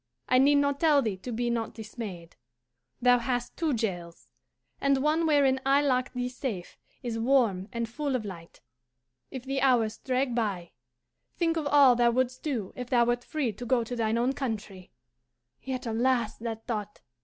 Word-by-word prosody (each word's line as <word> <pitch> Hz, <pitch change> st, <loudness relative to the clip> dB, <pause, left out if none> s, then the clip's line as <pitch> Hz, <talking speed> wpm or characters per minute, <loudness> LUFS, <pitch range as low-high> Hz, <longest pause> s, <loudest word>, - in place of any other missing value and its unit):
I 255 Hz, -, +4 dB
need 285 Hz, +2 st, +5 dB
not 285 Hz, -1 st, +2 dB
tell 300 Hz, -4 st, +4 dB
thee 210 Hz, -4 st, -2 dB
to 245 Hz, +7 st, -7 dB
be 240 Hz, +1 st, -1 dB
not 230 Hz, -2 st, -2 dB
dismayed. 210 Hz, -6 st, -8 dB, 0.7 s
Thou 245 Hz, 0 st, +6 dB
hast 245 Hz, 0 st, -2 dB
two 325 Hz, -2 st, 0 dB
jails, 175 Hz, -7 st, -4 dB, 0.5 s
and 275 Hz, -1 st, +3 dB
one 315 Hz, +2 st, +2 dB
wherein 275 Hz, -3 st, +3 dB
I 275 Hz, +2 st, +3 dB
lock 255 Hz, -2 st, +1 dB
thee 250 Hz, -1 st, -2 dB
safe 250 Hz, -8 st, -5 dB, 0.3 s
is 230 Hz, -2 st, -3 dB
warm 225 Hz, -7 st, +2 dB
and 235 Hz, -1 st, -2 dB
full 280 Hz, +3 st, -2 dB
of 230 Hz, -4 st, -2 dB
light. 170 Hz, -4 st, -10 dB, 0.7 s
If 260 Hz, -2 st, -7 dB
the 270 Hz, 0 st, -2 dB
hours 240 Hz, -5 st, +2 dB
drag 255 Hz, -1 st, -1 dB
by, 200 Hz, -7 st, -2 dB, 0.7 s
think 335 Hz, -1 st, +1 dB
of 315 Hz, -3 st, -1 dB
all 280 Hz, -4 st, +6 dB
thou 240 Hz, 0 st, +4 dB
wouldst 255 Hz, +1 st, 0 dB
do 240 Hz, -11 st, -3 dB
if 250 Hz, -1 st, -6 dB
thou 240 Hz, -2 st, +4 dB
wert 240 Hz, +1 st, 0 dB
free 270 Hz, -7 st, -2 dB
to 245 Hz, -, -9 dB
go 240 Hz, 0 st, +2 dB
to 245 Hz, +2 st, -5 dB
thine 225 Hz, -1 st, 0 dB
own 245 Hz, +3 st, +1 dB
country 210 Hz, -8 st, -5 dB, 0.7 s
yet 260 Hz, -1 st, -4 dB
alas 235 Hz, 0 st, +1 dB
that 225 Hz, -1 st, -5 dB
thought! 210 Hz, -3 st, -4 dB
245 Hz, 180 wpm, -28 LUFS, 225-270 Hz, 0.7 s, Thou